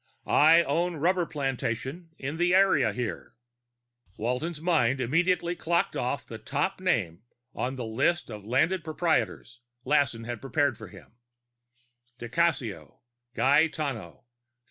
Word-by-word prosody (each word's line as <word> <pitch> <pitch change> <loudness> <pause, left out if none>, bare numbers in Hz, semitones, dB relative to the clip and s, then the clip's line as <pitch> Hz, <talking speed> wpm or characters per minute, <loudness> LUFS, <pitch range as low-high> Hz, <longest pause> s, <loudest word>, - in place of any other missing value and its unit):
I 165 +3 +6
own 170 +4 0
rubber 175 +3 +1
plantation 135 +2 -3
in 140 +4 -5
the 175 +1 +3
area 190 - +4
here." 120 +2 -5 0.8
Walton's 125 +9 -2
mind 145 -7 +2
immediately 170 +6 +1
clocked 170 0 0
off 125 +3 -2
the 115 - -9
top 190 - -2
name 100 - 0 0.3
on 130 +2 -3
the 125 -2 -5
list 135 +7 0
of 105 -2 -8
landed 155 - +1
proprietors 150 - -1 0.3
Lassen 130 -5 +1
had 120 -1 -6
prepared 135 0 +1
for 110 0 -10
him: 115 +5 -16 1.0
_di 120 0 -7
Cassio, 120 - -1 0.3
Gaetano. 140 - +1
140 Hz, 120 wpm, -27 LUFS, 120-170 Hz, 1.0 s, I